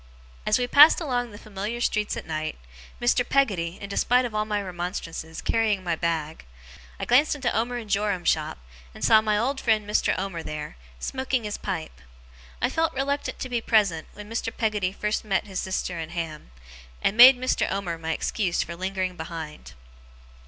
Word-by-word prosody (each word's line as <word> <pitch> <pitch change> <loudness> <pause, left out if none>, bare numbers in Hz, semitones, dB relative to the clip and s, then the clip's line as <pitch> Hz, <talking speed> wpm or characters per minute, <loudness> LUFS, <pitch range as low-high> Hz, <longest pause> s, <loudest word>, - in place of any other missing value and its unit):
As 215 - +4
we 250 - 0
passed 290 +5 +8
along 245 -7 -1
the 205 - -11
familiar 210 +3 -5
street 210 -3 0
at - - -6
night 155 -1 -3 0.4
Mr. 245 +1 +3
Peggotty, 195 -11 +1
in 200 - -6
despite 245 +5 +2
of 235 - -5
all 215 0 0
my 210 -1 -1
remonstrances, 175 -3 -5
carrying 215 -4 +1
my 170 -2 0
bag 160 -2 -2 0.6
I - - -2
glanced 285 +5 +4
into 255 -4 -1
Omer 240 +2 0
and 230 -3 -7
Joram's 200 -3 0
shop, 155 -1 +1 0.4
and - - -3
saw 220 -1 +7
my 215 -1 +1
old 265 +5 -1
friend 215 -3 +2
Mr. 210 - +1
Omer 190 -3 -3
there, 150 - -6 0.2
smoking 260 - -2
his 210 -1 -4
pipe. 160 - -5 0.6
I - - +5
felt 325 0 0
reluctant 280 +1 -1
to 260 - -5
be 240 -2 -1
present, 200 -9 +2
when 210 0 -10
Mr. 225 +1 -3
Peggotty 210 -6 -1
first 210 +2 -2
met 195 -2 0
his 190 -3 -4
sister 185 -2 -3
and 165 +1 -6
Ham; 165 - -5 0.5
and 200 - +2
made 250 +2 +10
Mr. 255 +1 0
Omer 180 -4 -3
my 160 0 -3
excuse 180 +2 0
for 170 - -7
lingering 185 0 -2
behind. 160 - -7
205 Hz, 180 wpm, -25 LUFS, 170-240 Hz, 0.6 s, made